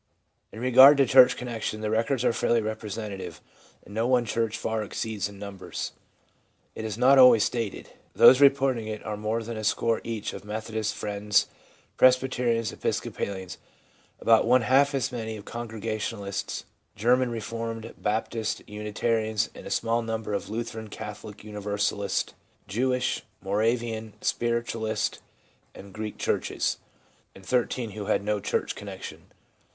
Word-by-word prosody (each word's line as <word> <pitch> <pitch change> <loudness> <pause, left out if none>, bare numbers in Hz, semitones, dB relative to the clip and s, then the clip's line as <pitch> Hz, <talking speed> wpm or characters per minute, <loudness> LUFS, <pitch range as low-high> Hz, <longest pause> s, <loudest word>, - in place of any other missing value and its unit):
In 110 - -9
regard 130 +3 +8
to 135 - +5
church 130 -1 +7
connection, 115 -3 -4
the 110 0 -2
records 115 +3 +1
are - - +3
fairly 115 +1 +2
representative, 105 -2 -5 0.5
and 100 - -12
no 115 +2 0
one 125 -2 +3
church 115 0 -1
far 110 0 -2
exceeds 105 -1 -3
in 100 - -12
numbers. 100 -2 -6 0.8
It 110 - -6
is 110 -1 -4
not 130 +3 +6
always 125 -4 +8
stated. 115 -4 -3 0.3
Those 130 +2 +8
reporting 135 -5 +4
it 110 -1 -6
are 105 - -3
more 110 +2 -2
than 115 0 -6
a 110 - -5
score 115 +1 +1
each 115 -3 -4
of - - -8
Methodists, 110 0 -3
Friends, 105 0 +1 0.5
Presbyterians, 125 -3 +3
Episcopalians; 95 -3 -4 0.6
about 115 0 +4
one 125 0 +5
half 140 +3 +4
as 130 -1 -1
many 110 -3 -4
of 100 - -11
Congrega 115 -2 -4
tionalists, 100 -2 -4 0.3
German 125 +4 +3
Reformed, 115 0 -5
Baptists 110 +1 -2
and - - -20
Unitarians; 110 +1 -1
a - - -9
smaller 115 +1 +1
number 110 -2 -3
of 100 - -2
the - - -10
Lutheran, 110 -1 -4
Catholic, 105 -1 -9
Universalist, 105 -1 -2 0.3
Jewish, 125 +5 0 0.2
Moravian, 110 +2 -1
Spiritualist 115 -2 -1 0.6
and 100 0 -12
Greek 110 +1 -5
churches; - - -1 0.6
and 95 - -14
thirteen 120 +1 0
who 105 0 -6
had 100 - +1
no 105 0 0
church - - -1
connection. - - -9
110 Hz, 145 wpm, -27 LUFS, 105-120 Hz, 0.8 s, regard